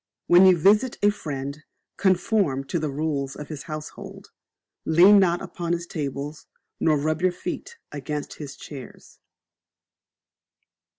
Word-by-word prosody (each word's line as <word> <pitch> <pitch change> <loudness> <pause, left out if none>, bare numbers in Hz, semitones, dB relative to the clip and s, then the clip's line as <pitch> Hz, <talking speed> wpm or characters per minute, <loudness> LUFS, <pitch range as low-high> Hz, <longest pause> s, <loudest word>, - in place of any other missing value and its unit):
When 180 +2 +7
you 185 -2 +6
Visit 210 +9 +3
a 205 - +6
Friend, 140 -5 -6 0.3
conform 185 -7 +1
to 150 +5 -2
the 155 -1 -2
rules 140 -2 -2
of 150 - -8
his 155 -3 -6
household; 155 0 -8 0.5
lean 185 +6 +7
not 175 -2 +2
upon 170 -1 -3
his 170 0 -2
tables, 145 -1 -5 0.3
nor 155 -2 +3
rub 155 +3 -1
your 185 0 +3
feet 185 - -6
against 145 +1 -5
his 140 -2 -7
chairs. 135 -4 -11
155 Hz, 130 wpm, -24 LUFS, 145-180 Hz, 0.5 s, When